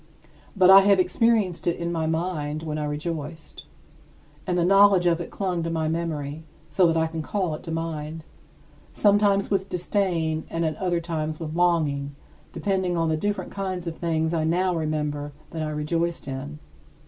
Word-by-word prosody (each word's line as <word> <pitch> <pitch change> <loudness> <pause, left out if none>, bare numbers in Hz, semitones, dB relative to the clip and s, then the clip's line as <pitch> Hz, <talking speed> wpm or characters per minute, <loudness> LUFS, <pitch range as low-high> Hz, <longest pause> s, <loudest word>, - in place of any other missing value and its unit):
But 185 0 +7
I 195 - +11
have 200 -1 +4
experienced 190 -1 +1
it 170 - +1
in 170 0 -3
my 160 -2 -1
mind 160 -2 -2
when 155 -1 -3
I 150 - -2
rejoiced; 155 +1 -5 0.8
and 180 -1 0
the 170 - +2
knowledge 195 -1 +6
of 170 -1 +2
it 170 - -6
clung 185 -3 -2
to 165 - -2
my 160 -1 -1
memory 160 -2 -3 0.3
so 175 +4 +4
that 165 0 +1
I 160 - +2
can 160 0 -4
call 185 0 -2
it 150 - -6
to 165 - -7
mind, 160 -1 -4 0.7
sometimes 205 -1 +3
with 195 -1 0
disdain 175 -4 -1
and 165 0 -1
at 155 -1 -1
other 175 -3 0
times 155 -2 -3
with 155 -2 -5
longing, 155 -5 +1 0.4
depending 190 -3 -1
on 165 -1 +1
the 160 - +2
different 205 +6 -2
kinds 185 -3 -4
of 165 -1 -4
things 160 -1 -1
I 160 -2 +1
now 180 +3 +1
remember 150 -2 -2 0.2
that 165 - -4
I 155 - -2
rejoiced 165 +2 -2
in. 140 +3 -5
165 Hz, 180 wpm, -25 LUFS, 155-180 Hz, 0.8 s, I